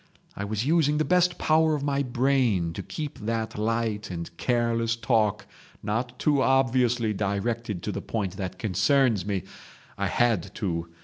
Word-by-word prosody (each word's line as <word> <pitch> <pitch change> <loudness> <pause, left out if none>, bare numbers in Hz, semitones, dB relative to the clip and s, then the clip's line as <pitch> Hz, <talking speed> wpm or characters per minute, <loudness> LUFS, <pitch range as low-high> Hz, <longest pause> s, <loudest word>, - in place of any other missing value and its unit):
I 100 - -4
was 110 +3 -2
using 150 -1 +3
the 155 - +1
best 180 0 +3
power 160 0 +3
of 145 - -4
my 140 -1 0
brain 125 -9 +1
to - - -5
keep 150 -1 -6
that 110 +1 -2
light 110 -1 -1
and 85 -1 -6
careless 115 -1 +1
talk 110 -2 +1 0.4
not 120 +4 -2
too 145 -3 +2
obviously 125 -4 +2
directed 105 0 -2
to - - -2
the - - -4
point 100 -5 -3
that 95 -1 -4
concerns 110 +1 +2
me. 100 -3 -1 0.6
I - - +1
had 105 -5 +1
to. 85 -5 -3
115 Hz, 160 wpm, -26 LUFS, 100-135 Hz, 0.6 s, using